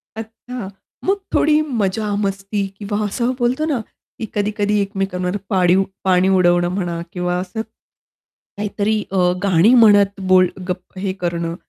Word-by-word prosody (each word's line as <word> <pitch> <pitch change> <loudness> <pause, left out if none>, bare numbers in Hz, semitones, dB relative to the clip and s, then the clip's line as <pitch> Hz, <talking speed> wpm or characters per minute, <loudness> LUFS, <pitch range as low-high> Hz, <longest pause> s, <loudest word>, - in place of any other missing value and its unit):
अच्छा. 225 -1 -7 0.4
मग 390 +2 +2 0.2
थोडी 305 0 +4 0.2
मजा-मस्ती 200 0 -1 0.2
किंवा 205 0 -3
असं 235 +5 -1
बोलतो 250 +6 +1
ना, 255 - 0 0.4
की 225 - -3
कधी-कधी 210 0 0
एकमेकांवर 195 -1 -2
पाणी 185 -2 +3 0.3
पाणी 185 0 +3
उडवणं 175 -1 +3
म्हणा 175 -3 -2
किंवा 180 0 -1
असं, 190 +4 -4 1.0
काहीतरी 210 +1 -1
अ, 195 - -1 0.3
गाणी 195 +5 +4
म्हणत 205 -2 +5
बोल 185 -1 +6 0.2
गप 180 +1 -6
हे 190 -1 -2
करणं 170 -1 -2
200 Hz, 130 wpm, -19 LUFS, 180-215 Hz, 1.0 s, बोल